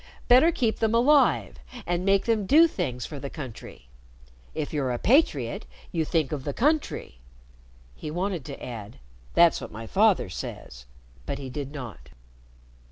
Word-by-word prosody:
Better 260 +7 +6
keep 235 -8 0
them 225 0 +1
alive 275 +4 +3 0.3
and 175 +1 -1
make 195 0 +3
them 220 -4 +1
do 320 - +7
things 130 - -3
for 145 - -7
the 140 - -6
country. 130 - -9 0.7
If 155 -1 -4
you're 140 -4 0
a 120 - -1
patriot, 150 - +2 0.2
you 165 -2 0
think 155 -3 0
of 145 -4 -3
the 145 - -4
country." 290 - 0 0.7
He 150 - -7
wanted 175 0 -2
to - - -8
add 110 -4 -8 0.4
"That's 170 -1 +5
what - - -8
my 115 +2 -8
father 205 - +3
says," - - -8 0.4
but - - -2
he 135 -2 -7
did 140 0 -5
not. 115 - -9
155 Hz, 160 wpm, -26 LUFS, -, 0.7 s, do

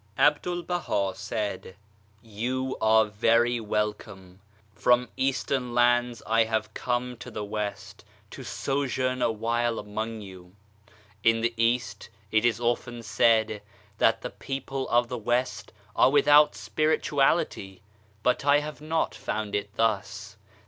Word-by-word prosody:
A 145 - +6
BDUL 175 +3 -5
BAHA 135 - -1
said: 105 -4 -4 0.5
You 125 +4 -3
are 110 0 +5
very 115 +3 +2
welcome! 105 -4 -4 0.3
From 125 +3 +2
Eastern 130 -2 -1
lands 120 -1 +2
I 115 0 +3
have 110 -1 -2
come 125 0 -2
to - - -9
the 105 - -5
West 105 0 -5 0.3
to - - -9
sojourn 130 -2 -2
awhile 115 +1 0
among 110 +2 -5
you. 95 -2 -12 0.7
In 115 0 +3
the 115 +1 0
East 115 -2 -1 0.2
it 110 +1 +3
is 120 -2 +2
often 120 0 -2
said 110 -1 +2 0.4
that 115 0 +3
the 125 - -4
people 135 0 -5
of 120 0 +3
the 125 -1 -5
West 120 +3 -1 0.2
are - - +5
without 145 -3 +5
spirituality, 120 - 0 0.4
but 125 +1 +1
I 145 0 +5
have 150 0 -5
not 160 +1 -1
found 110 -2 -4
it 100 0 -2
thus. 105 -1 -1
115 Hz, 130 wpm, -27 LUFS, 105-130 Hz, 0.7 s, A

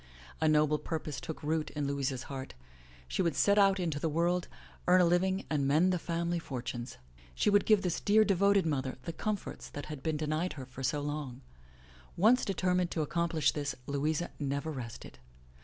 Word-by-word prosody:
A 160 - +3
noble 150 0 +3
purpose 155 -4 -4
took 160 - -7
root 155 +1 0
in 145 -1 -1
Louisa's 135 -2 -2
heart. 135 - -7 0.5
She - - -1
would 170 -5 +1
set 200 0 +4
out 195 -1 +5
into 165 -5 -1
the* 160 - 0
world, 175 +3 +1 0.4
earn 180 +1 +6
a 180 - +6
living, 185 +3 +1
and 145 -3 0
mend 165 +6 +4
the 180 - 0
family 170 +1 -1
fortunes. 125 -4 -5 0.4
She 210 - +2
would 205 -1 +3
give 215 -3 +5
this 180 -3 0
dear 215 +1 +5
devoted 200 -1 +3
mother 135 -5 -1
the 165 - -5
comforts 210 +3 -4
i8 - - -25
THE - - -8
LATCH 145 - -4
KEY - - -9
that - - -12
had 150 -3 -6
been 155 0 -1
denied 155 +4 -1
her 130 -4 -8
so 140 +3 0
long. 145 -3 -4 0.8
Once 230 +7 +5
determined 180 -2 +1
to 160 - -2
ac 150 - -6
complish 170 -2 +1
this, 145 -3 -3
Louisa 150 +4 -1
never 140 +2 -2
rested. 120 - -8
160 Hz, 200 wpm, -31 LUFS, 145-180 Hz, 0.8 s, earn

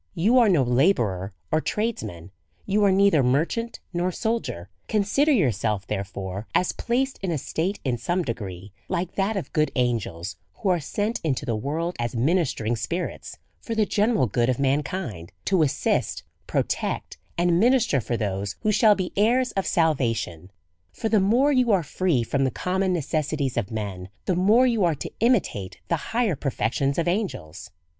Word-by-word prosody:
You 225 +10 +4
are 230 -3 +5
no 165 -8 +4
labourer 120 - +2 0.2
or 155 - +2
tradesman, 110 - -3 0.3
you 205 +1 +2
are 200 - +5
neither 195 -5 +4
merchant 160 - 0
nor 175 +1 0
soldier; 220 - -2 0.2
consider 220 +9 +2
yourself, 110 - +1
therefore, 100 0 -5
as 180 - +3
placed 260 +3 -1
in 190 - -2
a 165 - 0
state, 175 +8 -2
in 125 -3 -1
some 175 +6 0
degree, 100 - -6 0.2
like 175 0 -2
that 200 +2 0
of 190 - -5
good 155 -1 +2
angels, 95 - -1 0.2
who 200 - -2
are 180 -2 +3
sent 205 +9 -2
into 140 -3 -1
the 115 -4 -1
world 160 +10 -2
as 120 0 -2
ministering 125 -4 +1
spirits 165 - -4 0.2
for 230 - -5
the 220 -1 +3
.general 210 - +2
good 120 +3 +1
of 125 - +1
mankind, 135 - -2
to 190 -3 +3
assist, 145 -4 0 0.2
pro - - +1
tect, - - -3 0.2
and 175 0 +3
minister 235 - +3
for 120 +2 -2
those 100 -1 -2
who 215 - +2
shall 210 0 +5
be 185 -2 -3
heirs 245 +5 +3
of 195 - -2
sal 160 -2 +3
vation. 110 - -3 0.4
For 220 - -3
the 220 - +4
more 240 +9 +3
you 255 -4 +3
are 190 -4 +3
free 155 -3 0
from 135 +4 0
the 135 - +2
common 185 +7 -1
necessities 155 -4 -1
of 115 -5 -1
men, 100 -4 -5 0.2
the 185 - +1
more 210 +8 +5
you 230 -5 +2
are 170 -3 +2
to - - -6
imitate 195 - +1
the 170 - +2
higher 225 -6 +1
perfections 135 0 -1
of 170 - 0
angels. 175 - -3
160 Hz, 175 wpm, -25 LUFS, -, 0.4 s, are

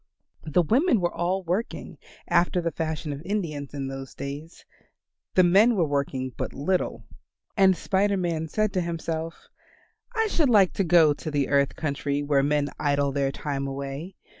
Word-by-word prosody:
The 175 +3 +3
women 245 - +3
were 175 -1 -1
all 185 +2 -1
working, 180 +7 -3 0.3
after 175 +1 +2
the 170 -1 -1
fashion 155 -2 -3
of 140 - -7
Indians 165 -8 -3
in 140 -2 -4
those 135 0 -7
days; 145 +4 -7 0.7
the 185 - +6
men 205 +7 +5
were 175 -5 +2
working 140 -3 -2
but - - -4
little. 180 +7 -1 0.5
And 190 -3 +5
Spider 200 +1 +1
Man 165 -3 -1
said 215 +4 0
to 185 - +1
himself, 165 -1 -4 0.7
"I 445 0 +2
should 330 -9 +1
like 200 -6 +5
to 195 - 0
go 165 -3 +5
to 155 - -6
the 145 -3 0
earth 140 -1 +2
country 145 -1 -2
where 145 -1 +2
men 145 0 +1
idle 145 -1 +1
their 135 0 0
time 140 -1 -3
away. 140 +6 -6
160 Hz, 165 wpm, -26 LUFS, 140-185 Hz, 0.7 s, the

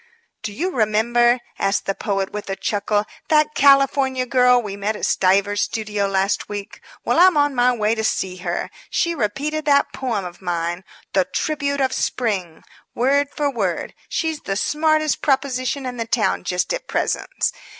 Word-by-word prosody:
"Do 210 - -4
you 345 - -2
remember," 240 +1 +3 0.2
asked 195 +1 0
the 195 - 0
poet, 195 -1 -2
with 210 -1 -6
a 195 - -1
chuckle, 205 +1 -1 0.2
"that 305 -1 +3
California 275 -2 +4
girl 250 0 +4
we 205 -4 -5
met 205 +2 -2
at - - -2
Stiver's 200 +2 +2
studio 210 -2 -1
last 195 0 0
week? 205 -1 -7 0.2
Well, - - +2
I'm 365 -2 +6
on 290 -1 +3
my 250 0 +3
way 215 -2 +1
to 220 -1 -2
see 190 -4 -1
her. 175 -1 -3 0.2
She 340 -1 0
repeated 295 +5 -2
that 280 -1 +3
poem 230 -7 -2
of 175 +1 -9
mine, 175 0 -2 0.3
'The 190 -2 +3
Tribute 280 - -2
of 260 -1 +1
Spring,' 190 -9 -2 0.3
word 280 +4 +2
for 290 -1 -1
word. 195 -9 -2 0.2
She's 320 -2 -1
the 195 - -3
smartest 310 +5 +1
proposition 270 -1 0
in 250 -1 -5
this 230 -1 -3
town 215 -5 +1
just 180 - -1
at - - -5
present. - - -1
235 Hz, 170 wpm, -21 LUFS, 200-280 Hz, 0.3 s, I'm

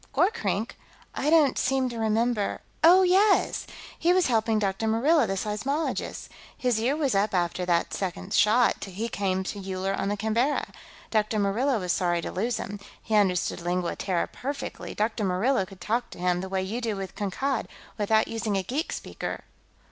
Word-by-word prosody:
"Gorkrink? 450 +5 0 0.3
I 290 - -1
don't 305 -5 +4
seem 265 -1 +1
to 235 -1 -6
remember.... 220 -1 0 0.2
Oh, 360 +3 +8
yes! 385 +3 +3 0.3
He 345 +2 +4
was 370 -1 +3
helping 225 -2 +2
Dr. 200 +1 -1
Murillo, 255 +5 +3
the 195 - -1
seismologist. 220 +11 -2 0.3
His 245 -3 +1
year 250 +6 +1
was 290 -4 0
up 200 +1 +1
after 180 0 0
the 170 -1 +3
second 185 +4 -4
shot; 225 +4 +4
he 200 +4 -4
came 190 -4 -1
to 200 +2 -5
Uller 190 0 -2
on 195 - -1
the 205 - -1
Canberra. 225 +7 0 0.4
Dr. 215 0 +1
Murillo 220 +6 +1
was 180 -2 0
sorry 175 -1 +1
to - - -5
lose 225 +5 -1
him. 205 +1 -5 0.2
He 220 - -6
understood 190 -5 +2
Lingua 175 0 -1
Terra 180 -3 -1
perfectly; 280 +2 -6
Dr. 220 0 -1
Murillo 195 +3 +1
could 195 -2 -13
talk 235 +3 -1
to - - -11
him, 180 0 0
the 190 - -6
way 190 0 -1
you 220 +6 -3
do 225 -3 -1
with 195 -1 -6
Kankad, 255 +7 -2 0.3
without 220 +1 +3
using 220 -3 -2
a 190 - -1
geek 275 - -2
speaker." - - -5
215 Hz, 180 wpm, -26 LUFS, 190-250 Hz, 0.4 s, Oh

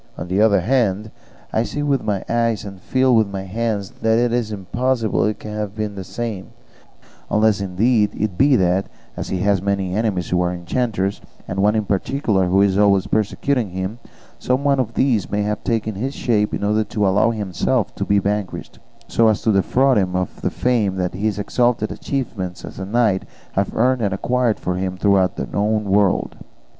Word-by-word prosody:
On - - -5
the 95 +3 +1
other 105 -3 +4
hand, 110 -2 0 0.4
I 110 - +2
see 145 +5 -3
with 140 -3 +1
my 100 -3 -1
eyes 115 -3 0
and 95 -2 -9
feel 130 +2 +2
with 110 -2 +4
my 100 -1 -5
hands 105 0 -2
that 110 0 +3
it 120 0 +2
is 120 -3 -1
impossible 115 +4 0
it 105 0 -1
can 105 - -8
have 105 -1 -4
been 105 -1 -3
the 95 -1 -6
same; 110 -2 -5 0.8
unless 105 -1 +2
indeed 105 +3 +2
it 105 -3 -1
be 135 +6 +4
that, 95 -2 +2 0.3
as - - -5
he 95 - -1
has 100 -2 +2
many 100 -2 -1
enemies 100 -5 -1
who 90 0 +2
are 90 0 +1
enchanters, 95 +2 -2 0.3
and 95 - -3
one 105 +2 +3
in 110 -1 0
particular 100 -1 0
who 95 +2 +4
is 100 0 +2
always 100 -2 +4
persecuting 110 +2 0
him, 95 +5 -4 0.4
some 130 +2 0
one 140 -2 +2
of 115 -3 -2
these 120 -7 +1
may 105 0 0
have 105 0 -2
taken 110 -2 -1
his 130 +8 -4
shape 105 -3 +1
in - - -3
order 105 +1 +2
to 105 -1 -1
allow 100 +4 +3
himself 105 +1 -1
to - - -3
be 100 0 +2
vanquished, 100 -1 -3 0.3
so 115 - +3
as 110 -2 +1
to 110 - +3
defraud 125 +6 +3
him 90 -2 -1
of 90 -1 -3
the - - 0
fame 115 -6 0
that 90 -1 -2
his 105 +2 -1
exalted 115 +1 0
achievements 100 -10 -4
as - - -10
a 95 - -4
knight 110 -3 +2 0.3
have 100 0 -1
earned 125 +2 +2
and 100 -3 0
acquired 120 +2 0
for 90 0 -2
him 95 0 -3
throughout 95 -2 +2
the - - -3
known 105 +1 0
world. 100 -1 +1
105 Hz, 195 wpm, -20 LUFS, 95-115 Hz, 0.8 s, other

